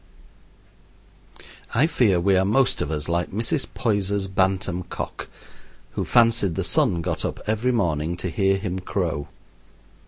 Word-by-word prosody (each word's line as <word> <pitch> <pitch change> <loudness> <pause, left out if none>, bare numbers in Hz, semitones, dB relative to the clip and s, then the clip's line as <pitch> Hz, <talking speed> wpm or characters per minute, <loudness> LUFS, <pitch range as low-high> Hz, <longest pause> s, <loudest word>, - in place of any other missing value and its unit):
I 135 +7 +5
fear 110 - +2
we 95 +2 +3
are 95 - +3
most 120 +7 +2
of - - -2
us 75 -2 -3
like 85 +1 0
Mrs. 115 +6 -1
Poyser's 100 -3 0
bantam 95 -1 0
cock, 90 - -6 0.6
who - - -2
fancied 115 -7 +3
the - - -1
sun 85 -1 +2
got - - -2
up - - -3
every 110 +4 +1
morning 85 -7 0
to 90 - -3
hear 95 +3 +2
him 95 -2 -3
crow. 85 -6 -2
95 Hz, 145 wpm, -24 LUFS, 85-110 Hz, 0.6 s, I